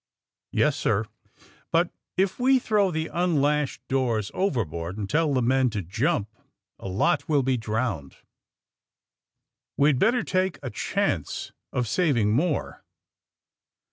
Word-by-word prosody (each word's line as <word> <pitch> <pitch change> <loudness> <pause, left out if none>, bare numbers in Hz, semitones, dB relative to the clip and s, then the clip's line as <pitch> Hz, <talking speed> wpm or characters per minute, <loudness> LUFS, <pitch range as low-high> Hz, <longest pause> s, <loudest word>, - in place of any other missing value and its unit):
*^YeSj - - +3
sir; - - 0 0.7
bnt - - +2 0.3
if 190 +3 +1
we 260 +2 +5
throw 210 -6 +2
tile 160 0 -3 0.2
nnlashed 150 -3 +1
doors 120 -6 0
overboard 95 - -2
and 105 -2 -3
tell 155 +5 +1
the 130 -3 +1
men 130 +1 +3
to 105 -4 -3
jump, 95 +3 0 0.5
a - - -7
lot 105 - +1
will 145 -3 +3
be 130 0 +2
drowned. 110 - -2 1.6
We'd 140 -2 +4
better 235 - +3
take 185 -2 0
a - - -4
chance - - -2 0.2
of 125 -2 -1
sav 155 - +2
ing 105 -2 +2
more.'' 150 +7 -1
135 Hz, 130 wpm, -26 LUFS, 110-175 Hz, 1.6 s, we